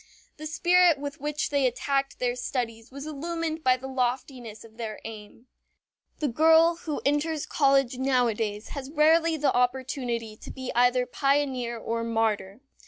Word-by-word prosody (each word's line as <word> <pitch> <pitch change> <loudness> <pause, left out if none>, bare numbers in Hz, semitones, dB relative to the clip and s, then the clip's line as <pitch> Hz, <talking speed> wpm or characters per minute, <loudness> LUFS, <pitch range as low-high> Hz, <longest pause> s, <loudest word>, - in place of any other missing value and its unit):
The 310 0 -6
spirit 350 0 +4
with 285 -1 -7
which 300 +1 -2
they 280 -2 +3
attacked 275 +2 -1
their 245 -1 -1
studies 235 -2 -4
was 280 +2 -8
illumined 320 +1 -4
by 255 -2 +4
the 260 - -10
loftiness 250 -3 -3
of 225 -1 -17
their 220 -3 -5
aim. 220 +1 -10 0.7
The 300 - -1
girl 320 +5 +5
who 310 -3 -5
enters 295 +2 0
college 275 -3 +2
nowadays 230 -5 0
has 275 -2 -6
rarely 320 +2 +3
the 295 -1 +1
opportunity 245 -3 -1
to - - -11
be 260 -1 -6
either 245 +1 +3
pioneer 265 -3 0
or 230 0 -3
martyr. 220 -2 -1
265 Hz, 150 wpm, -26 LUFS, 235-295 Hz, 0.7 s, girl